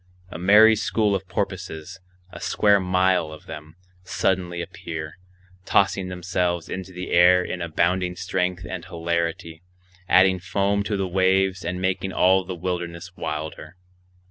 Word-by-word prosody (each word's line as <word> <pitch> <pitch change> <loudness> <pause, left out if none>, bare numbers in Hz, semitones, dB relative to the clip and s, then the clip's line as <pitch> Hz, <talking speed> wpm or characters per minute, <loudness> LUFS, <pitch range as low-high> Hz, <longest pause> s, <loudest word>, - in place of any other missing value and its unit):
A - - -7
merry 105 +5 +7
school 105 -1 0
of 95 -1 -3
porpoises, 95 -3 -4 0.3
a - - -9
square 100 -1 +3
mile 90 -3 +1
of 80 - -12
them, 75 +1 -10 0.3
suddenly 90 -1 -1
appear, 85 -2 -7 0.4
tossing 95 0 +2
themselves 90 -1 -2
into 95 0 -6
the 90 0 -7
air 90 +1 +6
in 90 - -5
abounding 90 +2 0
strength 90 0 -2
and 90 -2 -6
hilarity, 85 -1 -3 0.5
adding 95 0 +5
foam 100 +2 0
to 105 -1 -1
the 95 -1 -1
waves 95 0 +1
and 90 +1 -3
making 95 +1 -1
all 95 +1 +4
the 90 0 -6
wilderness 90 0 -5
wilder. 75 +1 -6
90 Hz, 140 wpm, -23 LUFS, 85-95 Hz, 0.5 s, merry